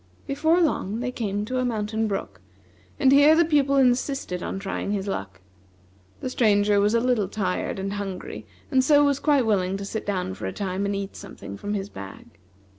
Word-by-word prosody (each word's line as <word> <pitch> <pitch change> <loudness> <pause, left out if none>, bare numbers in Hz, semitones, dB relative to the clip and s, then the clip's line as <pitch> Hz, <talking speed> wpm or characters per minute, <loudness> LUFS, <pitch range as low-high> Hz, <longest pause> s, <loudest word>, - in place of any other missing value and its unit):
Before 315 +5 +2
long 230 - 0
they 250 +1 -2
came 205 -4 -2
to 255 +3 -2
a - - +1
mountain 220 -2 -1
brook, 100 - -4 0.6
and 265 - +5
here 285 +3 +7
the 340 +1 +4
Pupil 285 -3 +2
insisted 255 -7 +1
on - - -4
trying 195 +1 -3
his 200 -1 -2
luck. 95 - -5 0.8
The 255 - -3
Stranger 205 -4 +3
was 205 +3 +2
a - - +4
little 240 -5 +1
tired 190 -2 -2
and 195 +1 -3
hungry, 200 -2 -6 0.2
and 260 -2 +4
so 290 +1 +5
was 280 -1 +1
quite 285 -5 +3
willing 195 -3 +1
to 200 - -6
sit 215 +1 -5
down 185 - -1
for 95 - -5
a 95 - -4
time 195 0 -2
and 200 - -1
eat 195 0 -5
something 100 - -9
from 205 - -4
his 195 0 -4
bag. 100 - -11
210 Hz, 195 wpm, -25 LUFS, 195-255 Hz, 0.8 s, here